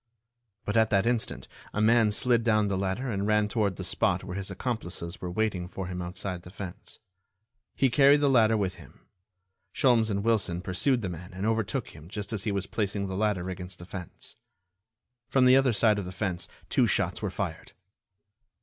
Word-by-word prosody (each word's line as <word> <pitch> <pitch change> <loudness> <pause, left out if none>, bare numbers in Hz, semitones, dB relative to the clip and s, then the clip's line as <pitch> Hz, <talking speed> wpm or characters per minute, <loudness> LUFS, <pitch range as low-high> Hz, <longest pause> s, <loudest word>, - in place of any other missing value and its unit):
But 105 - -2
at 110 0 +4
that 100 0 +2
instant 120 -1 -1 0.3
a - - 0
man 110 0 +4
slid 120 +1 +2
down 110 -3 +2
the 100 - 0
ladder 95 +7 -2
and 100 -1 -1
ran 105 -1 +3
toward 105 -3 0
the - - -6
spot - - +1
where 90 - -6
his 100 0 -4
accomplices 95 -5 -4
were 90 - -4
waiting 95 -2 -1
for 95 +1 -6
him 90 0 -4
outside 90 +1 -4
the 90 - -12
fence. 100 +1 -8 0.8
He 135 -2 +2
carried 140 +2 +6
the 145 - +3
ladder 115 -4 +4
with 95 -3 -2
him. - - -18 0.7
Sholmes 120 -4 +3
and 100 -1 -1
Wilson 100 -6 0
pursued 120 +7 +1
the 95 - -2
man 90 +1 -8
and 95 +2 -3
overtook 110 -2 -1
him 75 +3 -13
just 105 +2 -5
as 100 -1 -1
he 105 - +1
was 100 -1 -1
placing 100 0 -2
the 95 -1 -4
ladder 100 -3 0
against 90 -1 -6
the 85 - -11
fence. 90 -2 -8 0.9
From 130 -2 +4
the 125 +1 +7
other 135 -1 +4
side 105 -1 +3
of 100 - -4
the 90 - -6
fence 95 -2 -2 0.2
two - - +3
shots - - 0
were - - -1
fired. - - -5
100 Hz, 195 wpm, -28 LUFS, 95-115 Hz, 0.9 s, the